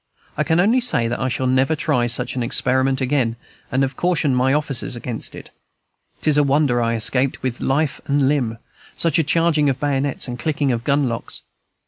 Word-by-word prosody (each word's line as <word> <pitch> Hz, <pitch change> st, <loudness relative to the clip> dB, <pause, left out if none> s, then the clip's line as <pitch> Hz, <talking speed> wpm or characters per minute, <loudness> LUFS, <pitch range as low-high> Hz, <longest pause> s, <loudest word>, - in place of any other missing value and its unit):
I -, -, 0 dB
can 160 Hz, +1 st, +1 dB
only 225 Hz, +8 st, +3 dB
say 150 Hz, -, +2 dB
that 120 Hz, -, -3 dB
I 130 Hz, -, -1 dB
shall 130 Hz, +1 st, -2 dB
never 130 Hz, +4 st, +2 dB
try 145 Hz, -6 st, 0 dB
such 125 Hz, +2 st, 0 dB
an 125 Hz, -, -2 dB
experiment 130 Hz, +2 st, +1 dB
again 130 Hz, -3 st, 0 dB, 0.4 s
and 130 Hz, +2 st, +1 dB
have 135 Hz, 0 st, -2 dB
cautioned 160 Hz, -6 st, +1 dB
my 130 Hz, +1 st, +2 dB
officers 140 Hz, -4 st, 0 dB
against 120 Hz, -1 st, -5 dB
it. -, -, -11 dB, 0.7 s
Tis 150 Hz, -2 st, +2 dB
a 145 Hz, -, +5 dB
wonder 140 Hz, -3 st, +2 dB
I 115 Hz, 0 st, 0 dB
escaped 125 Hz, +4 st, 0 dB
with 125 Hz, -2 st, -3 dB
life 140 Hz, +1 st, 0 dB
and 140 Hz, -1 st, +2 dB
limb, 125 Hz, -6 st, 0 dB, 0.4 s
such 165 Hz, -1 st, +2 dB
a -, -, +3 dB
charging 155 Hz, -1 st, +2 dB
of 130 Hz, -1 st, -2 dB
bayonets 140 Hz, -2 st, -1 dB
and 120 Hz, -1 st, -6 dB
clicking 145 Hz, -2 st, 0 dB
of 115 Hz, -1 st, -2 dB
gun 140 Hz, +1 st, +1 dB
locks. 115 Hz, -2 st, -6 dB
135 Hz, 195 wpm, -20 LUFS, 125-150 Hz, 0.7 s, a